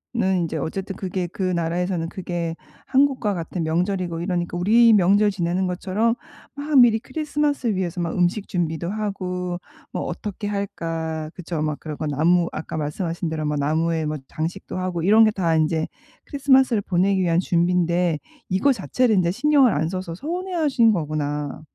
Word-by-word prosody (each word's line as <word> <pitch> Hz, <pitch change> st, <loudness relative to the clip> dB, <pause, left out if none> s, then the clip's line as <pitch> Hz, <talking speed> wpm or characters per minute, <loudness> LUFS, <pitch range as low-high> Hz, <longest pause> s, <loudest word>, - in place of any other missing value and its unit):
인제 185 Hz, -7 st, 0 dB
어쨌든 190 Hz, +6 st, -4 dB
그게 185 Hz, -1 st, -3 dB
그 190 Hz, +3 st, -5 dB
나라에서는 175 Hz, -1 st, -1 dB
그게 175 Hz, -3 st, -4 dB, 0.3 s
한국과 265 Hz, -6 st, +2 dB
같은 170 Hz, 0 st, -4 dB
명절이고 175 Hz, +1 st, -1 dB
이러니까 175 Hz, -1 st, -2 dB
우리 225 Hz, +6 st, +5 dB
명절 205 Hz, +1 st, +4 dB
지내는 185 Hz, -1 st, -1 dB
것처럼 190 Hz, +6 st, 0 dB, 0.4 s
막 290 Hz, -1 st, +2 dB
미리 235 Hz, -3 st, +6 dB
크리스마스 290 Hz, +1 st, -1 dB
위해서 180 Hz, -1 st, -2 dB
막 170 Hz, -1 st, -2 dB
음식 180 Hz, +3 st, +1 dB
준비도 170 Hz, -2 st, -2 dB
하고 180 Hz, -4 st, -3 dB, 0.3 s
뭐 -, -, -3 dB
'어떻게 205 Hz, -1 st, -5 dB
할까?' 165 Hz, -6 st, -3 dB
그쵸? 170 Hz, -3 st, -4 dB
막 155 Hz, -1 st, -2 dB
그런 155 Hz, -2 st, -6 dB
거 155 Hz, -, -3 dB
나무 170 Hz, +4 st, +2 dB
아까 155 Hz, -, -6 dB
말씀하신 165 Hz, +3 st, -3 dB
대로 155 Hz, -1 st, -3 dB
나무에 155 Hz, +2 st, 0 dB
뭐 150 Hz, 0 st, -2 dB
장식도 170 Hz, +5 st, -4 dB
하고 180 Hz, -2 st, -2 dB
이런 215 Hz, +5 st, +6 dB
게 -, -, +4 dB
다 175 Hz, -6 st, +1 dB
인제 160 Hz, 0 st, +1 dB, 0.4 s
크리스마스를 265 Hz, -5 st, +3 dB
보내기 190 Hz, +1 st, +1 dB
위한 170 Hz, -2 st, +2 dB
준비인데 175 Hz, -1 st, +1 dB, 0.3 s
이거 195 Hz, +9 st, +3 dB
자체를 235 Hz, +1 st, +1 dB
인제 175 Hz, -2 st, +3 dB
신경을 275 Hz, +3 st, +4 dB
안 155 Hz, +2 st, 0 dB
써서 185 Hz, -2 st, -4 dB
서운해 355 Hz, -, -4 dB
하신 280 Hz, -9 st, +3 dB
거구나. 150 Hz, -5 st, -2 dB
180 Hz, 360 characters per minute, -23 LUFS, 165-210 Hz, 0.4 s, 미리